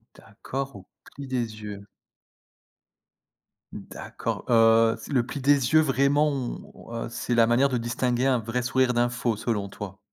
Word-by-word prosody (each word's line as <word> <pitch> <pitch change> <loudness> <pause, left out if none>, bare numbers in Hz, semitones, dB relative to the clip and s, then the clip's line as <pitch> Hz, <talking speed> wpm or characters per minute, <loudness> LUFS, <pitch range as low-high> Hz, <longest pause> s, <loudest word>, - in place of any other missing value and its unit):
D'accord, 135 -1 -7
au 95 - -15 0.2
pli 140 0 -10
des 115 -4 -3
yeux. 105 -1 -8 1.9
D'accord, - - -6
heu, 115 -1 +5
c'est, - - -11
le 125 -4 +2
pli 140 - -6
des 140 -2 +2
yeux 155 - +7
vraiment 145 +1 +2
on 130 -3 -6
heu, - - -7
c'est 120 +1 -2
la 115 -1 +5
manière 120 +4 +4
de 130 - -1
distinguer 120 +2 -1
un 130 -2 +3
vrai 115 +3 -2
sourire 130 0 +1
d'un 120 0 +2
faux 120 -2 -1
selon 105 -2 -2
toi? 100 -1 -9
120 Hz, 160 wpm, -25 LUFS, 115-135 Hz, 1.9 s, yeux